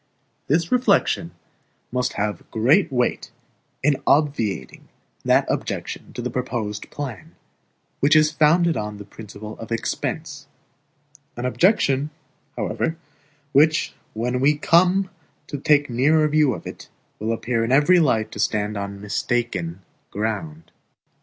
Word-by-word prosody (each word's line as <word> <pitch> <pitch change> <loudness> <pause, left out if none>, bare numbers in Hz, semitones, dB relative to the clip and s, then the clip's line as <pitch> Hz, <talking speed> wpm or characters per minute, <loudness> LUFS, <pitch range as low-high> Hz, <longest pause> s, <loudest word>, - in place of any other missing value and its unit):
This 165 +3 +1
reflection 210 -8 +2 0.6
must 125 0 -1
have 105 -3 -3
great 135 - +3
weight 125 -2 0 0.5
in 145 -1 +3
obviating 115 - 0 0.4
that - - +3
objection - - -4
to 120 - -5
the 125 - -3
proposed 115 -5 -3
plan, 130 - -7 0.6
which 145 +2 +4
is 155 0 +5
founded 165 +2 +3
on 105 -1 -4
the 105 - -10
principle 105 +1 -10
of 115 - -9
expense; 140 +4 -3 0.9
an 120 - -3
objection, 145 - +2 0.5
however, 160 0 -2 0.5
which, 155 +3 +3 0.2
when 125 +3 -1
we 145 +3 +3
come 180 +4 +3 0.3
to 145 - -6
take 145 0 +3
a 120 - -7
nearer 155 +5 +4
view 150 -5 +3
of - - -10
it, - - -9 0.3
will 110 +2 -1
appear 115 0 -1
in 115 - -1
every 150 +7 +5
light 115 -8 +1
to - - -8
stand 105 0 0
on 100 0 -5
mistaken 100 -4 -2 0.3
ground. 110 +10 -4
130 Hz, 130 wpm, -22 LUFS, 110-155 Hz, 0.9 s, is